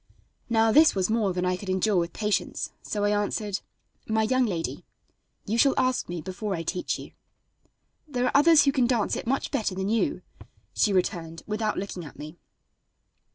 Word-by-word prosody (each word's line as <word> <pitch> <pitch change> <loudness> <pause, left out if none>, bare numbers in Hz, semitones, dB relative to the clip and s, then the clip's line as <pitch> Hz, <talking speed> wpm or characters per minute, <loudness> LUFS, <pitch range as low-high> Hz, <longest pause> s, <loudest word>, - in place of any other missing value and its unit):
Now 225 -1 +3
this 310 +2 +6
was 190 +2 0
more 220 -4 +1
than 180 0 -2
I 180 0 +1
could 190 +1 -8
endure 190 +2 +2
with 170 -1 0
patience, 210 +1 -2
so 205 -1 -3
I 205 - +2
answered: 205 -1 -1 0.5
"My 220 0 +1
young 255 +2 +2
lady, 170 -5 -3 0.6
you 225 +3 -1
shall 275 +1 +4
ask 255 -5 +1
me 175 -2 -4
before 195 +3 -4
I 165 - -4
teach 180 - -2
you." - - -10 1.0
"There 250 -4 -1
are - - +1
others 295 +1 +6
who 275 - +4
can 260 -3 +2
dance 235 -4 +1
it - - -5
much 270 +2 -1
better 205 -4 -1
than 190 +1 -2
you," 225 +1 0 0.5
she 210 - +2
returned, 170 -3 -1
without 215 0 -2
looking 190 -2 -5
at 150 - -11
me. 155 +3 -9
210 Hz, 185 wpm, -26 LUFS, 185-230 Hz, 1.0 s, this